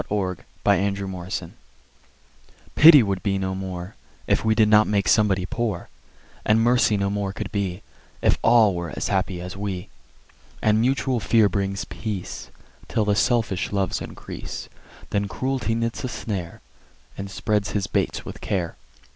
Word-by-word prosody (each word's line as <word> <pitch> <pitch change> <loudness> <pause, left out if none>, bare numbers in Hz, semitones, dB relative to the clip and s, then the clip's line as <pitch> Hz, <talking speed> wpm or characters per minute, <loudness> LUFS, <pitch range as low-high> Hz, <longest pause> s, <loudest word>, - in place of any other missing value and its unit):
The 105 - -4
Human 95 0 -1
Abstract 90 -2 -5 1.2
Pity 150 -4 +9
would 100 -2 -2
be 100 -2 0
no 95 -1 -2
more 95 0 -5 0.3
If - - +1
we 110 -1 +2
did 110 -1 +5
not 105 0 +5
make 100 -3 +1
somebody 100 -3 +3
Poor; 110 -3 -3 0.5
And 110 +1 +3
Mercy 120 -3 +3
no 100 0 0
more 100 -1 -2
could 105 -1 -5
be 100 -2 -2 0.4
If - - +2
all 115 -4 +5
were 85 -2 -4
as - - -1
happy 90 -2 0
as 90 +2 -7
we. 95 -2 -4 0.7
And 110 0 +3
mutual 130 0 +1
fear 110 +2 +4
brings 100 -1 -2
peace, 105 -5 -5 0.4
Till 110 - 0
the 105 -1 +2
selfish 110 -4 +1
loves 100 -2 -1
increase: - - -7 0.4
Then 100 0 0
Cruelty 130 0 -1
knits 115 0 -2
a - - -1
snare, 100 -8 -5 0.5
And 100 0 -6
spreads 105 +1 -1
his 100 -2 0
baits - - -1
with - - -8
care. 90 -4 -2
100 Hz, 155 wpm, -24 LUFS, 95-110 Hz, 1.2 s, Pity